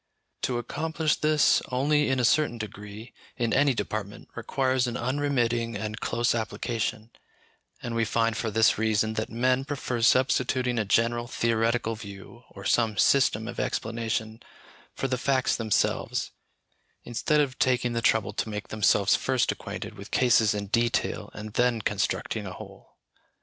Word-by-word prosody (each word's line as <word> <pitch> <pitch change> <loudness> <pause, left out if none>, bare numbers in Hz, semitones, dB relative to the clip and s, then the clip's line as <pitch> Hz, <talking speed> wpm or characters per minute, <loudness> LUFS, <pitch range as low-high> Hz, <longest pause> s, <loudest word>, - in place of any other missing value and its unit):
To 125 - -1
accomplish 155 +5 -1
this, 155 -1 +3
only 145 +3 +2
in 130 -1 +1
a 125 - +2
certain 145 -1 +2
degree, 105 +1 -8 0.2
in 120 -2 0
any 145 -3 +3
department, 105 -3 -5
requires 130 +1 0
an 120 0 -3
unremitting 120 -3 0
and 110 +2 -4
close 120 +1 0
application; 110 0 -3 0.7
and 120 - -4
we 115 0 +1
find, 115 0 +1
for 115 +2 -2
this 110 0 +3
reason, 110 0 +1
that 110 0 -3
men 125 +3 +1
prefer 135 -4 -3
substituting 125 0 +2
a 110 - 0
general 120 +3 +1
theoretical 115 -1 0
view, 105 +2 -11
or 100 -1 -11
some 110 -2 +2
system 110 -5 +3
of 120 - -6
explanation, 110 -1 -2 0.5
for 135 - -2
the 125 -1 -2
facts 130 -1 +1
themselves, 110 -3 0 0.7
instead 150 +6 0
of 135 -3 0
taking 125 -2 +2
the 115 - -1
trouble 110 -2 +2
to 110 - -2
make 105 -1 -5
themselves 105 -1 +3
first 130 -2 +1
acquainted - - -7
with 100 - -9
cases 115 -4 +3
in 100 0 -3
detail 115 +4 0
and 105 0 -7
then 120 -1 +2
constructing 105 -2 -2
a - - -6
whole. - - -13
115 Hz, 150 wpm, -27 LUFS, 110-130 Hz, 0.7 s, this